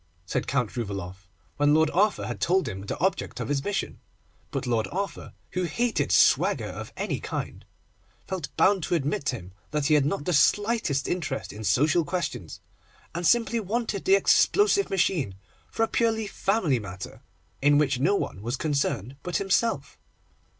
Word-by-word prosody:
said - - -2
Count 125 -5 -1
Rouvaloff, 95 -4 -5 0.3
when 145 +1 +4
Lord 160 0 +3
Arthur 205 +4 +2
had - - -5
told 185 +2 +2
him 95 +1 -5
the - - -3
object 190 +2 -1
of - - -4
his 140 -1 0
mission; 205 -1 -3 0.5
but - - -3
Lord 115 -3 0
Arthur, 195 +2 -4 0.2
who 185 - -1
hated 235 +8 0
swagger - - +4
of - - -7
any - - -2
kind, - - -5 0.6
felt 185 -6 -4
bound 195 -1 +4
to 175 - 0
admit 145 -2 -1
to 130 - 0
him 90 -5 -10 0.2
that 150 -1 -1
he 155 - +3
had 145 -2 +4
not 150 -2 -2
the 180 - 0
slightest 205 - +2
interest 160 -6 -3
in 110 +1 -8
social 150 +9 +3
questions, 170 - -4 0.5
and 170 0 0
simply 235 -1 +3
wanted 215 -1 -2
the 195 - +6
explosive 405 - +4
machine 175 - 0 0.3
for 225 - -1
a - - +2
purely 225 -1 +1
family 195 - 0
matter, 95 -3 -8 0.4
in 145 +1 +5
which 140 -3 +2
no 185 +10 +3
one 95 - -3
was 120 +4 -3
concerned 140 - -1
but 180 - -2
himself. 200 +4 0
155 Hz, 170 wpm, -26 LUFS, 130-195 Hz, 0.6 s, the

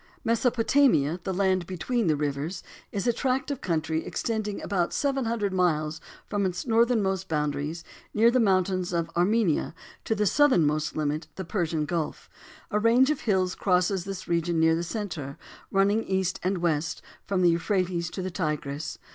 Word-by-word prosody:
Mesopotamia, 230 - +2
"The 190 - -2
land 185 -2 +1
between 215 +4 -1
the 155 - +3
rivers," 145 +4 -3 0.3
is 200 - -3
a 240 - +3
tract 265 +3 -1
of 280 - -4
country 160 -2 -1
extending 215 -3 -3
about 180 -3 -1
seven 275 -3 0
hundred 220 -4 -1
miles 155 -4 0 0.2
from 205 -1 -1
its 180 -2 -2
northernmost 225 -5 +2
boundaries, 150 +1 -2 0.3
near 230 +2 +4
the 255 - +3
mountains 185 -4 +1
of 165 -1 -1
Armenia, 180 -2 +1 0.3
to 220 - 0
the 210 0 +1
southernmost 155 - +3
limit, 150 +1 -1
the 190 - -5
Persian 165 -4 -1
Gulf. 165 0 -4 0.4
A 210 - +2
range 240 +6 +4
of 300 - -2
hills 190 -4 +1
crosses 180 0 +1
this 195 -1 -6
region 170 0 0
near 160 0 +4
the 165 - 0
center, 170 - -5 0.3
running 200 +3 +2
east 190 -1 -1
and 185 +1 0
west, 160 -2 -1 0.2
from 190 -2 +1
the 175 - +6
Euphrates 175 -1 0
to 185 - -5
the 185 - -3
Tigris. 150 -4 -3
185 Hz, 165 wpm, -27 LUFS, 165-210 Hz, 0.4 s, the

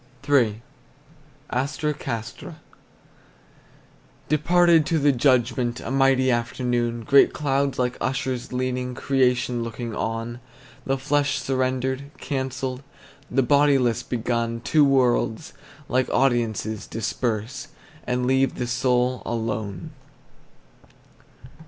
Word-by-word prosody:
III. 120 -6 +2 0.9
ASTRA 150 +4 -1
CASTRA. 115 -6 -6 1.7
Departed 170 +2 +4
to 165 - +1
the 145 -1 +4
judgment, 125 -2 +1
A - - -6
mighty 135 -1 +3
afternoon; 120 0 -1
Great 140 +1 +5
clouds 140 -1 0
like 125 -1 -1
ushers 130 -1 -2
leaning, 125 0 -2
Creation 125 -2 +1
looking 115 0 -5
on. 115 +1 -3 0.5
The 135 0 +1
flesh 145 +1 0
surrendered, 130 +1 -1
cancelled, 130 -2 -3 0.5
The 135 +1 +2
bodiless 140 -3 +3
begun; 115 -1 -2
Two 150 +5 +3
worlds, 130 0 +1 0.3
like 130 0 +1
audiences, 115 -5 0
disperse 115 +3 -3 0.4
And 125 0 0
leave 130 0 +2
the 125 - -2
soul 125 +1 +1
alone. 110 -5 -4
125 Hz, 95 wpm, -24 LUFS, 120-135 Hz, 1.7 s, Great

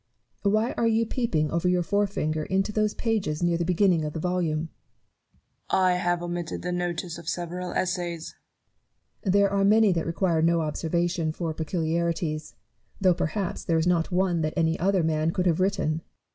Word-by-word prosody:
Why 215 +3 +2
are 230 - +2
you 225 0 +2
peeping 170 - -1
over 170 +2 +1
your 180 -1 +2
forefinger 185 -6 0
into 195 +2 0
those 215 0 0
pages 200 -9 -1
near 175 -1 +2
the - - +1
beginning 180 -1 +2
of 150 -1 -3
the 160 - -4
volume? 175 -3 0
Newton. 160 +1 -5 1.0
I 185 -1 +3
have 175 -1 0
omitted 175 -1 -4
the 180 - -2
notice 175 -1 -3
of 170 - -6
several 180 +1 -4
Essays. 175 -3 -2 0.9
Barrow. 190 - 0
There 200 +1 +4
are 200 0 +2
many 210 +1 +5
that 165 -2 -1
require 165 -1 +1
no 165 +1 +3
observation 165 +1 -1
for 160 0 -3
peculiarities; 160 -1 -2 0.4
though 185 -2 +4
perhaps 175 +3 -2
there 165 - +1
is 160 - +1
not 175 -1 +1
one 180 -2 +1
that 155 0 -2
any 165 -1 +1
other 190 0 +2
man 155 0 +1
could 180 +2 -1
have 170 -2 +2
written. 190 -3 +1
Newton. 155 +1 -2
175 Hz, 180 wpm, -26 LUFS, 165-190 Hz, 1.0 s, many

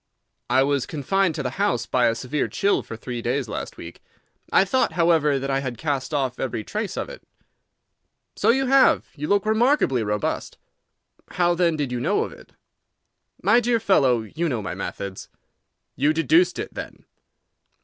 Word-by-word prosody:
"I 130 +2 +4
was 140 -2 0
confined 165 +4 0
to 150 - -3
the 125 - -2
house 125 - +1
by 125 -1 +2
a 115 - +1
severe 135 +5 -2
chill 200 +1 +1
for 115 - -9
three 120 0 -5
days 125 +2 -1
last 105 - -6
week. - - -10 0.5
I 195 - +5
thought, 255 +7 +1
however, 165 -4 +3
that 135 +1 -3
I 135 - +1
had 130 -3 -5
cast 140 0 -2
off 135 -4 -1
every 120 -4 -3
trace 210 - -4
of - - -2
it." - - -10 1.1
"So - - +1
you 265 +3 +3
have. 270 +1 +4
You 150 0 -4
look 205 0 +2
remarkably 220 - +2
robust." 105 -1 -2 0.8
"How, 175 -1 +2
then, 170 -2 +2
did 145 -4 -2
you 125 - -2
know - - +1
of - - -6
it?" - - -16 0.9
"My 210 +6 +5
dear 240 -1 +1
fellow, 135 - +3
you 160 +10 -3
know 120 -6 -2
my 90 - -4
methods." 100 -1 -6 0.7
"You 145 +3 +2
deduced 315 - +3
it, - - -5
then?" - - -8
145 Hz, 175 wpm, -23 LUFS, 125-195 Hz, 1.1 s, I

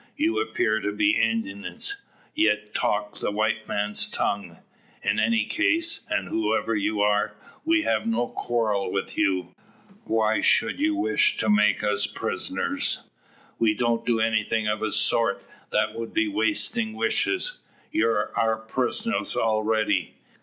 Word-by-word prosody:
You 330 +6 +1
appear 110 - 0
to 105 - -2
be 155 +10 +2
Indians, 115 - -1 0.4
yet 105 - +1
talk 105 0 -1
the - - -1
white 110 +1 -1
man's 105 0 -1
tongue. 95 -5 -2 0.5
In - - +1
any 230 -1 +2
case, 330 0 +1
and 320 -1 -1
whoever 110 +1 0
you 105 0 0
are, 105 0 +1 0.3
we 330 0 +3
have 230 - 0
no 230 - 0
quarrel 110 -6 -1
with - - -3
you. 95 -2 0 0.5
Why 110 -1 +1
should 115 -4 +2
you 105 -1 +1
wish 110 +2 +2
to 110 - +1
make 105 0 +3
us 105 -1 +2
prisoners?" - - -2 0.6
"We 110 -2 +3
don't 120 -1 0
do 115 -1 +1
anything 110 0 +1
of 105 0 0
the 110 0 -2
sort. - - +2 0.3
That - - +1
would 115 0 -7
be 330 0 +2
wastin' 245 -7 +1
wishes. 390 - 0 0.3
You're 115 -1 0
our 110 -1 +1
pris'ners 130 - -2
already." 110 0 0
110 Hz, 140 wpm, -25 LUFS, 105-155 Hz, 0.6 s, we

